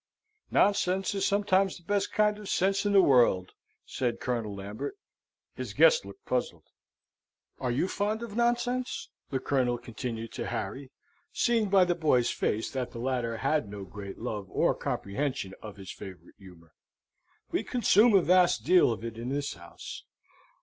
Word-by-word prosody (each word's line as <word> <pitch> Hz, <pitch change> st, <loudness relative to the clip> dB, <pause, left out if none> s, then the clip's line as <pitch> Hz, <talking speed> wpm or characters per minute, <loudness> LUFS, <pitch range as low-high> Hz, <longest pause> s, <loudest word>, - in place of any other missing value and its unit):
"Nonsense 195 Hz, -1 st, +2 dB
is 195 Hz, -1 st, 0 dB
sometimes 195 Hz, -1 st, +2 dB
the 175 Hz, -, -18 dB
best 200 Hz, +3 st, 0 dB
kind 210 Hz, 0 st, +2 dB
of 210 Hz, -, -8 dB
sense 195 Hz, +2 st, +1 dB
in 205 Hz, -, +1 dB
the 195 Hz, -1 st, +7 dB
world," 120 Hz, -9 st, +4 dB, 0.3 s
said 120 Hz, -2 st, -2 dB
Colonel 115 Hz, -5 st, -2 dB
Lambert. 100 Hz, -, -6 dB, 0.6 s
His -, -, -6 dB
guest -, -, +5 dB
looked 395 Hz, -, -12 dB
puzzled. -, -, -2 dB, 1.0 s
"Are 130 Hz, -, -2 dB
you 125 Hz, +9 st, +1 dB
fond 210 Hz, +4 st, -1 dB
of 220 Hz, -3 st, -7 dB
nonsense?" 240 Hz, +1 st, 0 dB, 0.2 s
the 135 Hz, -, -1 dB
Colonel 130 Hz, -2 st, +1 dB
continued 115 Hz, -1 st, -6 dB
to -, -, -5 dB
Harry, 130 Hz, +8 st, -4 dB, 0.4 s
seeing 230 Hz, -4 st, +1 dB
by 190 Hz, -2 st, +5 dB
the 175 Hz, -, +1 dB
boy's 150 Hz, -8 st, +2 dB
face 110 Hz, +2 st, -1 dB
that 130 Hz, -2 st, -3 dB
the 115 Hz, -, -6 dB
latter 120 Hz, -2 st, -1 dB
had 135 Hz, -4 st, 0 dB
no 100 Hz, -1 st, -7 dB
great 100 Hz, +1 st, -8 dB
love 105 Hz, -4 st, -4 dB
or -, -, +2 dB
comprehension 115 Hz, -2 st, -3 dB
of 105 Hz, -2 st, -9 dB
his 95 Hz, -2 st, -8 dB
favourite 95 Hz, -2 st, -11 dB
humour. 85 Hz, -5 st, -16 dB, 0.8 s
"We -, -, 0 dB
consume 230 Hz, -2 st, +4 dB
a 190 Hz, -, +5 dB
vast 175 Hz, -7 st, +4 dB
deal 180 Hz, -5 st, +5 dB
of 115 Hz, -, -5 dB
it 115 Hz, -1 st, -6 dB
in 120 Hz, +2 st, -4 dB
this 140 Hz, +1 st, -2 dB
house. 85 Hz, -1 st, -10 dB
135 Hz, 165 wpm, -29 LUFS, -, 1.0 s, the